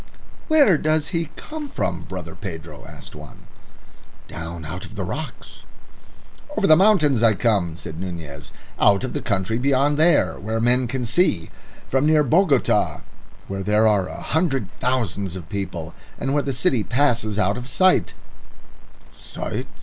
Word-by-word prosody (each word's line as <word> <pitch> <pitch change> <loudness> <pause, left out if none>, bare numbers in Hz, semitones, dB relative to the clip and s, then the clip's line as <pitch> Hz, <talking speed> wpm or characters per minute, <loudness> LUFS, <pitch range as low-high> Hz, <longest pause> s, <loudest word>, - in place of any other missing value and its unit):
"Where 285 - +5
does 155 -1 +1
he 165 -2 -2
come 305 -2 -7
from, 85 - -3
brother 90 -3 -7
Pedro?" 80 -6 -8
asked - - -11
one. - - -12 0.8
"Down 80 +1 -7
out 85 +4 -6
of 110 - -10
the 100 - -3
rocks." 155 - -6 1.0
"Over 210 - +2
the 155 - +7
mountains 160 - +4
I 115 -2 +5
come," 95 -6 +1
said 80 -1 -7
Nunez, 80 -6 -7 0.3
"out 100 +3 +4
of 130 - -3
the - - -3
country 100 +2 -1
beyond 140 +2 +2
there 155 - +3
where 110 +3 -2
men 120 +2 +3
can 125 +1 -3
see. 115 - +1 0.4
From 135 +3 +1
near 155 -1 +4
Bogota, 150 -1 +2 0.5
where 95 0 -4
there 105 +3 +2
are 100 -3 +2
a - - -7
hundred 135 - 0
thousands 100 -7 -1
of 90 -4 -8
people, 90 -5 -5 0.2
and 135 - -2
where 145 - +2
the 140 - -3
city 125 -2 +1
passes 120 -5 +1
out 100 -1 +1
of 125 - -8
sight." 185 +5 +2 1.0
"Sight?" - - -6
115 Hz, 155 wpm, -22 LUFS, 95-145 Hz, 1.0 s, the